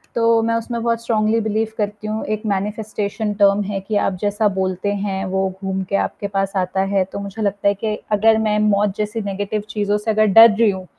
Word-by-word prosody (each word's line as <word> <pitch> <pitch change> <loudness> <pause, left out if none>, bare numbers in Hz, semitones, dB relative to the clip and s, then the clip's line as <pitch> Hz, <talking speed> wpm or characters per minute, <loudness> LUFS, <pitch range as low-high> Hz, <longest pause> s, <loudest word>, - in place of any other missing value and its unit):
तो 230 -1 +3
मैं 230 0 +1
उसमें 230 +1 -3
बहुत 230 -1 0
स्ट्रांगली 220 -1 +1
बिलीव 220 +1 0
करती 210 0 -3
हूँ 215 +1 -3
एक 215 +1 -12
मैनिफेस्टेशन 210 +1 -2
टर्म 200 0 +5
है 200 0 -3
कि 210 +3 -4
आप - - -1
जैसा 205 +1 +1
बोलते 185 +2 -1
हैं, 195 -1 -3
वो 190 0 0
घूम 190 0 -2
के 200 - 0
आपके 200 - -2
पास 195 0 -2
आता 185 +1 0
है, 195 0 +1
तो 190 - -7
मुझे 200 +2 -6
लगता 200 -1 0
है 200 - +4
कि 215 +2 -2 0.2
अगर 220 +1 +4
मैं 215 -1 +1
मौत 205 -1 +2
जैसी 210 +1 -2
नेगेटिव 205 +1 -3
चीज़ों 210 -1 0
से 210 +2 -2
अगर 215 0 +3
डर 225 +3 +8
रही 225 0 +4
हूँ, 190 -1 -7
210 Hz, 220 wpm, -20 LUFS, 195-220 Hz, 0.2 s, डर